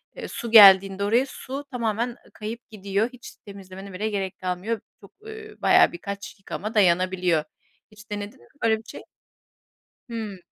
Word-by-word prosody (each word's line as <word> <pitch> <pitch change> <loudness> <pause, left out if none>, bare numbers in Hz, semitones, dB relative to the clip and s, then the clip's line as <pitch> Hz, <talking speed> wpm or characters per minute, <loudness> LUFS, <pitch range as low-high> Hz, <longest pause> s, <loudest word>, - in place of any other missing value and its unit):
eee, - - -7
su 235 -1 -6
geldiğinde 195 -2 +8
oraya, 235 +6 +3
su 270 +1 -7
tamamen 235 0 -2 0.2
kayıp 220 +2 -6
gidiyor. 200 +1 -1
Hiç 250 - -12
temizlemene 195 -1 -10
bile 210 +4 -2
gerek 195 -2 -3
kalmıyor. 185 +5 -3 0.2
Çok, 200 - -16 0.2
ııı, 440 -1 -11
bayağı - - +5
birkaç 200 +3 -7
yıkama 210 +2 -6
dayanabiliyor. 180 -4 +2 0.5
Hiç 215 +1 -16
denedin 205 0 -6
mi 120 - -20 0.2
böyle 220 -1 +3
bir 220 - -14
şey? - - -9 1.1
Hıı. 220 -4 -5
205 Hz, 150 wpm, -24 LUFS, 190-225 Hz, 1.1 s, geldiğinde